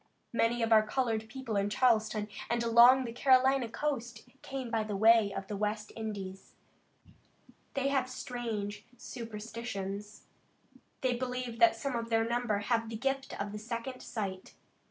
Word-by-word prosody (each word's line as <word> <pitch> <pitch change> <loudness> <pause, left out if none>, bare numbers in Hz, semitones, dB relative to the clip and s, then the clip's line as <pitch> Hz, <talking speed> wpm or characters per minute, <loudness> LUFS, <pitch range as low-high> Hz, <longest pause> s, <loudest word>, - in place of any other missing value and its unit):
Many 235 +1 +2
of 225 - 0
our 215 - +8
colored 220 -1 -1
people 240 -2 -5
in 200 0 +1
Charleston 215 -2 +2 0.2
and 235 0 +1
along 240 +3 +7
the 230 - -4
Carolina 260 0 +4
coast 250 -3 -3
came 265 -3 -5
by 225 -2 +1
the 210 -1 -4
way 220 0 +5
of 195 - -5
the 205 - -5
West 210 +1 -2
Indies. 200 -4 -6 1.2
They 275 0 +1
have 265 -2 +1
strange 220 -5 -4
superstitions. 210 -3 -6 0.8
They 255 -1 +2
believe 250 -1 -4
that 345 -1 +6
some 275 -3 -3
of 230 0 -3
their 225 0 +2
number 240 -3 0
have 230 +1 0
the 225 - -5
gift 270 +2 -2
of 205 +1 -4
second 235 +3 -5
sight. 195 -5 -5
230 Hz, 150 wpm, -31 LUFS, 210-250 Hz, 1.2 s, our